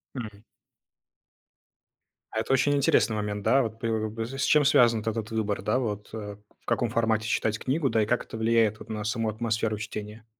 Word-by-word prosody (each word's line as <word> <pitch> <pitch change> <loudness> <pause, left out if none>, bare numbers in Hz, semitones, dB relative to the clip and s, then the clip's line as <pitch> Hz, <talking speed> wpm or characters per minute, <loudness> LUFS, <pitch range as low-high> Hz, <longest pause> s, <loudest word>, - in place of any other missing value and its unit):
Мгм. 105 -5 -7 1.9
А 110 - -1
это 110 +4 0
очень 135 +2 +3
интересный 125 -5 +3
момент, 105 -1 -3
да, 135 +5 +4
вот 110 0 -5
п 115 - -2
и, 115 +3 -3
с 140 - -1
чем 150 0 +4
связан 120 -5 +5
вот - - -10
этот 110 0 -4
выбор, 105 -3 -1
да, 105 +6 +1
вот 105 -4 -4
э, 105 -2 -6 0.3
в - - -34
каком 120 - 0
формате 110 -1 +1
читать 110 0 0
книгу, 135 +2 0
да, 110 -3 +2
и - - 0
как - - 0
это - - -8
влияет 110 -1 +2
вот - - -12
на 110 -1 -4
саму 110 +1 -1
атмосферу 110 0 -1
чтения? 105 +1 -7
110 Hz, 195 wpm, -27 LUFS, 105-115 Hz, 1.9 s, связан